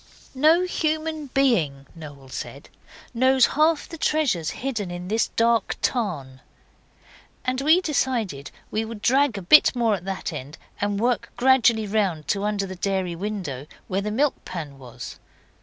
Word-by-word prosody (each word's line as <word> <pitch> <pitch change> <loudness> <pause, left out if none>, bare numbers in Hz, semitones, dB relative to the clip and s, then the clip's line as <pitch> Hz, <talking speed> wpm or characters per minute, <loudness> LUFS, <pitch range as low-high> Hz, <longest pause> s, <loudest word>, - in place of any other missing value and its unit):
'No 310 +6 +4
human 315 -3 -2
being,' 185 - +1
Noel 145 -5 -11
said, - - -7 0.4
'knows 260 +2 +4
half 310 +1 +2
the 330 - -9
treasures 290 - +1
hidden 230 -8 -4
in 175 +1 -6
this 220 +2 +1
dark 230 0 +2
tarn.' 150 - -2 1.0
And 255 +1 -1
we 315 +6 +5
decided 235 - -1 0.2
we 220 - 0
would 225 -1 -8
drag 265 -3 +3
a 195 - -6
bit 285 - +6
more 230 -3 +2
at 185 -3 -4
that 190 -3 -4
end, 145 +1 -7 0.2
and 205 0 0
work 245 +2 0
gradually 245 -4 +4
round 195 -7 -1
to 200 -1 0
under 205 -1 -1
the 190 -1 -7
dairy 185 -2 -2
window 175 -8 -5 0.2
where 190 +1 -1
the 210 - -3
milk 270 +6 0
pan 150 -6 -7
was. 125 -3 -9
215 Hz, 155 wpm, -24 LUFS, 175-265 Hz, 1.0 s, bit